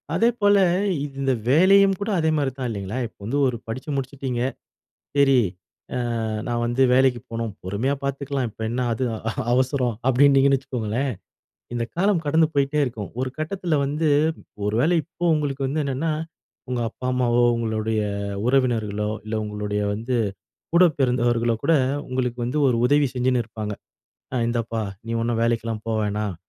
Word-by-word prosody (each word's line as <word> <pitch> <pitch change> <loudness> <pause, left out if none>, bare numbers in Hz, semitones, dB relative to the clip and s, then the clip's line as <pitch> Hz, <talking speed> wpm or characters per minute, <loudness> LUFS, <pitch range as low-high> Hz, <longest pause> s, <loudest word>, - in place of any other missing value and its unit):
அதேபோல, 215 -3 +3 0.6
இந்த 135 -1 +1 0.2
வேலையும் 195 +6 +6
கூட 200 - -3
அதே 160 -1 +2
மாரி 140 -2 0
தான். 130 -2 -2
இல்லைங்களா, 100 +1 -4
இப்ப - - -25
வந்து 135 +7 0
ஒரு 125 -2 -2
படிச்சு 130 +6 -6
முடிச்சிட்டீங்க. 135 -2 -3 0.8
சரி, 135 -2 +5 0.8
அ - - -2 0.2
நான் 120 -1 -1
வந்து 120 +3 +1
வேலைக்கு 130 -2 +3
போணும். 115 -1 -3
பொறுமையா 100 +9 -1
பாத்துக்கலாம். 140 -2 -2
இப்ப 110 - -20
என்ன 125 +2 -2
அது 130 +3 -1 0.5
அவசரம், 130 -1 +1
அப்டின்னீங்கன்னு 135 +1 +5
வச்சுக்கோங்களேன், 125 0 -2 0.6
இந்த 120 - 0
காலம் 180 -1 +2
கடந்து 160 +2 +4
போயிட்டே 140 +1 +1
இருக்கும். 115 -6 -5
ஒரு 130 - -1
கட்டத்துல 165 0 -1
வந்து 150 +3 0 0.6
ஒரு 105 - 0
வேள 165 +6 +3
இப்போ 175 - -7
உங்களுக்கு 140 -3 -1
வந்து 155 +3 -1
என்னன்னா, 140 +4 -1 0.6
உங்க 125 -1 -1
அப்பா 125 - -7
அம்மாவோ, 120 -1 +2
உங்களுடைய 110 -1 -1 0.5
உறவினர்களோ, 110 -5 +1
இல்ல 110 - -4
உங்களுடைய 105 0 -2
வந்து 115 +4 -2 0.6
கூட 180 - +7
பிறந்தவர்களோ 120 -2 +2
கூட, 165 - +4 0.4
உங்களுக்கு 125 -1 -2
வந்து 125 +5 -1
ஒரு 125 -3 +3
உதவி 145 +1 +4
செஞ்சுன்னு 125 -1 +1
இருப்பாங்க. 110 -1 -5 0.6
அ - - 0
இந்தாப்பா 115 -1 -1 0.3
நீ 115 - -3
ஒன்னும் 115 -1 0
வேலைக்கெல்லாம் 115 -2 -1
போ 115 - -1
வேணாம், 105 -1 -2
125 Hz, 145 wpm, -23 LUFS, 115-140 Hz, 0.8 s, கூட